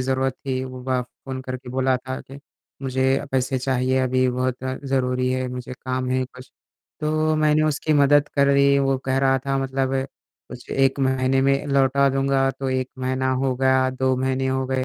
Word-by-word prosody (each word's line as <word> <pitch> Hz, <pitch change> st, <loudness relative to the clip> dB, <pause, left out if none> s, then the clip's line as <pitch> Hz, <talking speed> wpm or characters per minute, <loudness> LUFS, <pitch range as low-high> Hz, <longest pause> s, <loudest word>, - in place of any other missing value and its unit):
ज़रूरत 130 Hz, +1 st, 0 dB
थी। 130 Hz, -1 st, -1 dB
वो 130 Hz, -1 st, -8 dB
बा 130 Hz, -1 st, 0 dB
फ़ोन 130 Hz, +2 st, -8 dB
करके 130 Hz, -1 st, -7 dB
बोला 130 Hz, 0 st, +1 dB
था 130 Hz, +1 st, -6 dB
कि, 135 Hz, +1 st, -12 dB, 0.4 s
मुझे 130 Hz, +1 st, +1 dB
पैसे 130 Hz, 0 st, 0 dB
चाहिए 130 Hz, 0 st, 0 dB
अभी 130 Hz, 0 st, +2 dB
बहुत 125 Hz, 0 st, -1 dB
ज़रूरी 130 Hz, -1 st, -1 dB
है 130 Hz, 0 st, -1 dB
मुझे 125 Hz, 0 st, -6 dB
काम 130 Hz, 0 st, -3 dB
है 130 Hz, 0 st, +1 dB
कुछ। 130 Hz, 0 st, -14 dB, 0.5 s
तो 155 Hz, +1 st, +1 dB
मैंने 155 Hz, 0 st, +3 dB
उसकी 155 Hz, 0 st, 0 dB
मदद 145 Hz, 0 st, +4 dB
कर 140 Hz, -1 st, +4 dB
दी। 140 Hz, 0 st, +4 dB
वो 135 Hz, -1 st, +2 dB
कह 130 Hz, 0 st, +1 dB
रहा 135 Hz, 0 st, +3 dB
था 135 Hz, 0 st, +1 dB
मतलब 135 Hz, 0 st, -1 dB, 0.5 s
कुछ 125 Hz, -1 st, -11 dB
1 135 Hz, 0 st, +2 dB
महीने 130 Hz, 0 st, +2 dB
में 135 Hz, +1 st, +1 dB
लौटा 140 Hz, 0 st, +3 dB
दूँगा। 135 Hz, 0 st, +1 dB
तो 135 Hz, 0 st, -5 dB
1 130 Hz, 0 st, -1 dB
महीना 130 Hz, 0 st, -1 dB
हो 130 Hz, 0 st, 0 dB
गया, 130 Hz, 0 st, +3 dB
2 130 Hz, 0 st, 0 dB
महीने 130 Hz, +1 st, -1 dB
हो 130 Hz, 0 st, -1 dB
गए 130 Hz, 0 st, -1 dB
130 Hz, 185 wpm, -23 LUFS, 130-135 Hz, 0.5 s, मदद